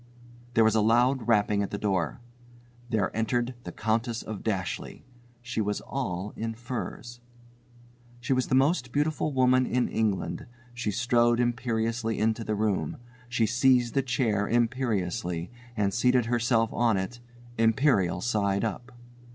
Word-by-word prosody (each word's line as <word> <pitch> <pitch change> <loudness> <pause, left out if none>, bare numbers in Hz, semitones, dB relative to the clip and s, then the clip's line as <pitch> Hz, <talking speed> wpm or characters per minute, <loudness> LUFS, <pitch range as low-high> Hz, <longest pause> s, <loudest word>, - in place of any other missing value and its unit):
There 115 - +6
was 110 -1 +4
a 110 - +3
loud 120 +3 +3
rapping 105 -2 +3
at 100 - -2
the 100 - -4
door. 95 -1 -1 0.7
There 105 -4 0
entered 120 +3 0
the - - -5
Countess 115 +1 -1
of 110 -2 -6
Dashleigh. 95 -5 -3 0.4
She 120 -2 -2
was 105 0 -1
all 100 -7 -4
in 115 0 -4
furs. 120 0 -6 1.0
She 125 +2 0
was 130 0 0
the 130 - +1
most 135 -1 +2
beautiful 150 +2 0
woman 130 -1 +3
in 125 0 +1
England. 105 -1 -1 0.3
She 120 -2 -3
strode 120 +2 +2
imperiously 115 -1 -1
into 110 +1 0
the 110 - -2
room. 105 - -1 0.3
She 120 -2 +2
seized 125 +1 +3
a 135 - +4
chair 115 -6 0
imperiously 115 -7 -1 0.3
and 100 -2 +1
seated 125 0 +3
herself 115 -1 +1
on 115 -4 +2
it, 95 +6 -4 0.4
imperial 115 - +3
side 100 -3 0
up. 120 +4 -5
115 Hz, 145 wpm, -27 LUFS, 105-125 Hz, 1.0 s, There